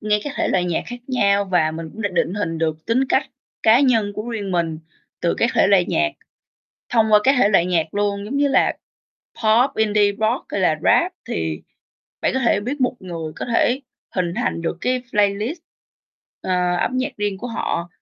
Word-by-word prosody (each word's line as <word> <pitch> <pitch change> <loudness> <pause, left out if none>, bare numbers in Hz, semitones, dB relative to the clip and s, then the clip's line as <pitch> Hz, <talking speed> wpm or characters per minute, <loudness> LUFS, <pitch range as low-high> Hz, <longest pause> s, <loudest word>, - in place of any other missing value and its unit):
nghe 210 0 +1
các 290 - -4
thể - - 0
loại 180 -1 +1
nhạc 175 -2 -1
khác 245 - -6
nhau, 200 -6 +2
và 175 -5 +2
mình 160 0 -7
cũng 220 - -7
đã 205 - +1
định 180 0 0
hình 165 -5 -2
được 160 -1 -2
tính 255 +4 +2
cách - - +1 0.3
cá 225 +3 +6
nhân 225 -7 +2
của 215 +3 -5
riêng 210 -4 -4
mình 165 -3 -1 0.4
từ 170 - +1
các 235 - +2
thể - - +4
loại 195 -3 +4
nhạc, 335 0 +1 0.8
thông 220 -2 +2
qua 210 - +8
các 270 - +5
thể 205 - +5
loại 180 -4 +3
nhạc 165 -2 0
luôn. 200 0 -1
Giống 240 +7 -4
như 285 0 +3
là - - +3 0.7
Pop, 230 +5 +4
Indie 210 -2 +3
Rock 220 +5 -1
hay 200 - -2
là 160 -4 +2
Rap - - +3 0.2
thì 80 -2 -2 0.6
bạn - - +1
có 265 - +1
thể 220 -5 +2
biết 260 +7 -4
một 250 - +1
người 165 -4 -6
có - - -5
thể 250 +3 +2 0.4
hình 175 -2 0
thành 230 -8 -1
được 165 +1 -3
cái 255 0 0
playlist, 210 - 0 0.8
ờ, 180 -1 0
âm 255 - -1
nhạc 260 +3 -1
riêng 205 -2 -2
của 240 - -6
họ, 175 -7 -3
205 Hz, 205 wpm, -21 LUFS, 175-235 Hz, 0.8 s, qua